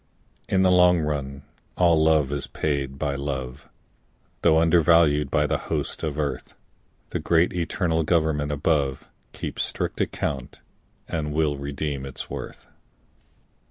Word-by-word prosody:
In 95 -1 +3
the 95 - +4
long 90 -1 +5
run 70 -2 -3 0.3
all 85 -3 +4
love 80 -3 +3
is 70 -1 -2
paid 70 -3 -2
by 70 -1 -1
love, 70 -1 -5 0.7
Though 80 -2 +4
undervalued 80 -3 +4
by 75 +2 +2
the - - 0
hosts - - -2
of 75 -2 -3
earth; 75 -2 -3 0.5
The - - -3
great 85 +1 +2
eternal 85 -1 0
Government 75 -2 +1
above 70 -2 0 0.2
Keeps - - -5
strict - - -2
account 65 -3 -3 0.5
and 75 -2 -3
will 75 -1 +1
redeem 70 0 -4
its 65 - -6
worth. - - -7
75 Hz, 130 wpm, -24 LUFS, 70-80 Hz, 0.7 s, long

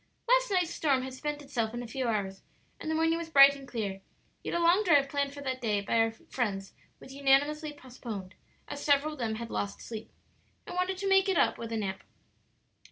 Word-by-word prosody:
Last - - +4
night's 360 -4 +1
storm 275 -4 +1
had 260 0 -6
spent 295 +2 -4
itself 240 -5 -2
in 240 - -4
a - - -7
few 255 +2 -3
hours, 195 -4 -2 0.4
and - - -5
the 315 - 0
morning 325 +1 +2
was 335 -1 -6
bright 280 -2 +8
and 275 -1 -11
clear; 200 -6 -4 0.4
yet - - -3
a - - +1
long 345 +5 +4
drive 290 -7 +4
planned 280 0 -1
for 285 0 -9
that 260 -1 -3
day 210 -3 +1
by 225 +3 +1
our 225 0 +4
friends 210 -3 -4 0.3
was 265 - -12
unanimously 285 +3 +2
postponed, 235 -8 -8 0.3
as 285 - -6
several 290 +1 +3
of 300 - -12
them 225 -2 -1
had 235 +1 -6
lost 200 0 -3
sleep, 225 -1 -8 0.5
and 355 - -7
wanted 365 +1 0
to 395 +1 -3
make 385 0 +4
it 375 - +2
up - - +2
with 230 0 -6
a 225 - -1
nap. 195 -3 -3
275 Hz, 220 wpm, -30 LUFS, 225-315 Hz, 0.5 s, bright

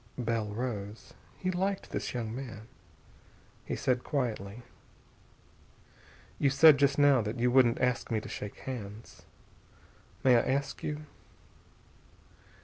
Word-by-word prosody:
Bell 115 -3 -1
rose. 105 -1 -5 0.2
He 185 - -1
liked 190 +2 -2
this - - -3
young 115 -3 -4
man. 115 -5 -8 1.0
He - - -3
said 125 -1 0
quietly: 115 -5 -3 1.8
"You 140 - +3
said 145 +1 +7
just 140 -1 +3
now 145 -3 +5
you 120 +3 0
wouldn't 125 -2 +4
ask 125 -2 0
me 110 - +1
to - - -9
shake 105 - -7
hands. 110 -4 -8 1.0
May 125 -2 +6
I - - +4
ask 140 +2 -2
you?..." 150 0 -4
125 Hz, 120 wpm, -30 LUFS, 110-140 Hz, 1.8 s, said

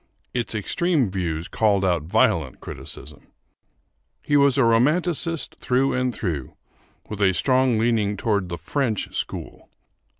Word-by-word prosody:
Its 120 -2 -2
extreme 140 - 0
views 85 -4 -3
called 100 -3 +2
out 85 -3 +1
violent 80 - +1
criticism. 75 0 -9 1.0
He 145 - +1
was 140 -2 +4
a 135 - +4
romanticist 155 +8 +1
through 130 +2 +1
and 125 0 0
through, 85 - -4 0.5
with 105 -1 -6
a 95 -2 +3
strong 130 -1 +2
leaning 110 -3 +1
toward 100 -4 0
the 85 - -4
French 115 - -2
school. - - -5
110 Hz, 130 wpm, -23 LUFS, 95-130 Hz, 1.0 s, was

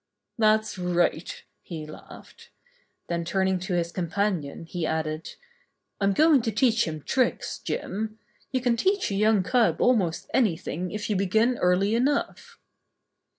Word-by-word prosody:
"That's 215 -2 +2
right," 175 -2 0 0.2
he 160 -3 -7
laughed. 155 - -13 0.6
Then 170 0 -2
turning 190 +1 0
to 185 0 -3
his 170 -1 -1
companion, 175 -4 -2
he 175 +1 -5
added: 155 0 -3 0.6
"I'm 200 -1 +2
going 310 +1 +5
to 225 - -1
teach 230 +2 +2
him 155 -2 -5
tricks, 255 -2 0
J - - -3
im. 215 +3 -5 0.3
You 260 -1 0
can 245 -1 +2
teach 380 - +1
a - - -1
young 210 -1 +3
cub 245 +3 +2
almost 195 -10 +1
anything 180 - 0
if 210 +3 -4
you 210 - 0
begin 220 +6 +2
early 185 +4 +2
enough." 270 +5 -1
195 Hz, 145 wpm, -26 LUFS, 175-230 Hz, 0.6 s, going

